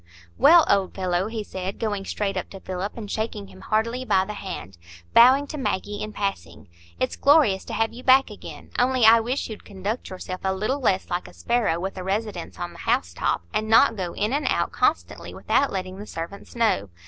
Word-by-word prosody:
"Well, 325 Hz, +3 st, +7 dB
old 195 Hz, -2 st, +1 dB
fellow," 185 Hz, 0 st, 0 dB
he 220 Hz, -1 st, -4 dB
said, 190 Hz, -1 st, -5 dB
going 205 Hz, -3 st, -2 dB
straight 200 Hz, -1 st, -2 dB
up -, -, -4 dB
to 195 Hz, -, -10 dB
Philip 190 Hz, +3 st, -5 dB
and 210 Hz, -3 st, -6 dB
shaking 220 Hz, -, -3 dB
him 95 Hz, 0 st, -14 dB
heartily 230 Hz, -, -1 dB
by 190 Hz, -6 st, +2 dB
the 210 Hz, -, -6 dB
hand, 95 Hz, -, -7 dB, 0.3 s
bowing 260 Hz, +4 st, +7 dB
to 300 Hz, +1 st, -7 dB
Maggie 205 Hz, -3 st, -2 dB
in 215 Hz, -, -4 dB
passing, 195 Hz, -, -4 dB, 0.3 s
"it's 130 Hz, -, -1 dB
glorious 275 Hz, -10 st, +4 dB
to -, -, -7 dB
have 225 Hz, 0 st, 0 dB
you 245 Hz, -, -9 dB
back 265 Hz, +1 st, +5 dB
again; -, -, -11 dB
only 250 Hz, -1 st, +3 dB
I 225 Hz, +1 st, +8 dB
wish 245 Hz, +5 st, -2 dB
you'd 215 Hz, -2 st, -9 dB
conduct 200 Hz, +4 st, -5 dB
yourself 185 Hz, 0 st, -7 dB
a 190 Hz, 0 st, 0 dB
little 215 Hz, +9 st, -1 dB
less 195 Hz, -8 st, 0 dB
like 175 Hz, +1 st, -2 dB
a -, -, -14 dB
sparrow 235 Hz, -8 st, 0 dB
with 190 Hz, +2 st, -4 dB
a 185 Hz, -, -5 dB
residence 195 Hz, -, -3 dB
on -, -, -5 dB
the -, -, -14 dB
house 85 Hz, 0 st, 0 dB
top, 85 Hz, -, -1 dB
and 215 Hz, 0 st, -1 dB
not 225 Hz, 0 st, +6 dB
go 180 Hz, -4 st, -4 dB
in 210 Hz, +4 st, -1 dB
and 290 Hz, +1 st, 0 dB
out -, -, +1 dB
constantly -, -, -1 dB
without 280 Hz, -, +1 dB
letting 185 Hz, 0 st, -5 dB
the 210 Hz, -, -8 dB
servants 170 Hz, +8 st, -8 dB
know. 220 Hz, -, +1 dB
205 Hz, 210 wpm, -24 LUFS, 185-230 Hz, 0.3 s, I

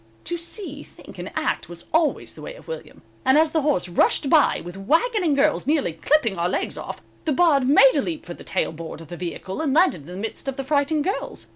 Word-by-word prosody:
To 345 Hz, -, -2 dB
see, 335 Hz, -3 st, -6 dB
think -, -, -14 dB
and -, -, -6 dB
act -, -, -1 dB
was 175 Hz, 0 st, -9 dB
always 320 Hz, -1 st, +1 dB
the -, -, -12 dB
way -, -, -7 dB
of -, -, -16 dB
William, 485 Hz, -, -8 dB, 0.2 s
and 265 Hz, +2 st, +5 dB
as 315 Hz, 0 st, +4 dB
the 315 Hz, -, +1 dB
horse 275 Hz, -12 st, +1 dB
rushed 225 Hz, -, +2 dB
by 310 Hz, -3 st, +5 dB
with 175 Hz, +1 st, -8 dB
wagon 335 Hz, -, +1 dB
and 310 Hz, -4 st, +2 dB
girls, 275 Hz, -2 st, +2 dB
nearly 290 Hz, -, +1 dB
clipping 225 Hz, -, +1 dB
our 175 Hz, +1 st, +1 dB
legs -, -, -2 dB
off, -, -, -7 dB, 0.2 s
the 315 Hz, -, +1 dB
Bard 280 Hz, -5 st, +3 dB
made 275 Hz, -1 st, +7 dB
a 285 Hz, -, +3 dB
leap 320 Hz, +2 st, -4 dB
for 175 Hz, -, -6 dB
the -, -, -12 dB
tail -, -, 0 dB
board 160 Hz, 0 st, -8 dB
of 165 Hz, -2 st, -12 dB
the 175 Hz, -, -6 dB
vehicle 180 Hz, -, -5 dB
and 290 Hz, -3 st, 0 dB
landed 340 Hz, -, +4 dB
in 140 Hz, -, -15 dB
the 180 Hz, +1 st, -8 dB
midst 220 Hz, +6 st, -5 dB
of 270 Hz, -, -2 dB
the 270 Hz, -, -4 dB
frightened 290 Hz, +2 st, +1 dB
girls. 390 Hz, +6 st, -3 dB
280 Hz, 245 wpm, -23 LUFS, -, 0.2 s, made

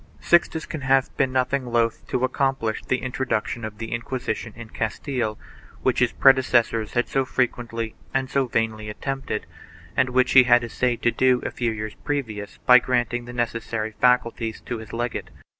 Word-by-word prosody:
Sixtus 170 Hz, -2 st, +2 dB
can 155 Hz, -, -6 dB
have 135 Hz, 0 st, +2 dB
been 135 Hz, -1 st, +1 dB
nothing 130 Hz, 0 st, 0 dB
loath 115 Hz, -1 st, 0 dB
to 125 Hz, -, -1 dB
accomplish 130 Hz, -4 st, -1 dB
the -, -, 0 dB
intro 125 Hz, +1 st, -3 dB
duction 115 Hz, -1 st, -2 dB
of 110 Hz, -1 st, -6 dB
the 115 Hz, +1 st, -6 dB
Inquisition 115 Hz, -1 st, -3 dB
in 120 Hz, -2 st, -10 dB
Castile, 110 Hz, -1 st, -2 dB, 0.5 s
which -, -, +2 dB
his -, -, +3 dB
predecessors 125 Hz, -4 st, +3 dB
had 120 Hz, 0 st, +1 dB
so 135 Hz, -, +1 dB
frequently 120 Hz, -3 st, -2 dB, 0.2 s
and 135 Hz, 0 st, 0 dB
so 135 Hz, 0 st, 0 dB
vainly 110 Hz, -2 st, -1 dB
attempted 135 Hz, -1 st, -4 dB, 0.5 s
and 130 Hz, -1 st, +2 dB
which 125 Hz, 0 st, +2 dB
he 130 Hz, -2 st, +8 dB
had 120 Hz, -1 st, +5 dB
essayed 120 Hz, +1 st, -1 dB
to 120 Hz, -, +4 dB
do 130 Hz, 0 st, +3 dB
a -, -, -2 dB
few 120 Hz, -1 st, -1 dB
years 110 Hz, -1 st, -4 dB
previous 110 Hz, -8 st, -4 dB
by 125 Hz, 0 st, +9 dB
granting 120 Hz, -1 st, -1 dB
the 120 Hz, -, -8 dB
necessary 115 Hz, -2 st, -2 dB
faculties 120 Hz, -3 st, +2 dB
to 120 Hz, -2 st, -5 dB
his 110 Hz, -, -10 dB
legate. 120 Hz, +1 st, -3 dB
120 Hz, 175 wpm, -24 LUFS, 115-130 Hz, 0.5 s, by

